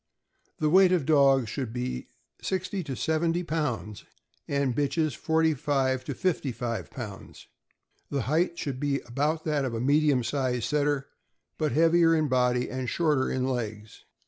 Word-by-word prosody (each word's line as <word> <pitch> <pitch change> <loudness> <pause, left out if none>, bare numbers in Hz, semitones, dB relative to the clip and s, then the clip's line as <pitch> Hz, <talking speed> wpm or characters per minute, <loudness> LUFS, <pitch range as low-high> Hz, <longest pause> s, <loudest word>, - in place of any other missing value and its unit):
The 155 -1 +1
weight 185 +1 +6
of 175 -7 +2
dogs 135 -5 +4
should 130 -5 -4
be 125 - -4 0.3
sixty 190 0 -2
to 135 - -4
seventy 165 +5 0
pounds, 125 - -3 0.4
and 140 -2 0
of - - -5
bitches, 150 +2 0
forty 160 0 +2
five 130 -2 0
to 140 - -4
fifty 170 -7 -1
five 115 -1 -4
pounds. 105 -7 -9 0.6
The 140 -3 -1
height 165 - 0
should 135 -3 -4
be 140 -1 0
about 150 +6 -1
that 150 -3 0
of 125 -3 -2
a - - -2
medium 140 0 +3
sized 125 -1 -1
Setter, 145 -2 0 0.5
but 155 -5 0
heavier 165 +2 +4
in 155 -2 +1
body 125 -1 +2
and 130 -1 -4
shorter 150 -6 +1
in 130 -1 -1
legs. 110 -4 -5
140 Hz, 160 wpm, -27 LUFS, 125-160 Hz, 0.6 s, weight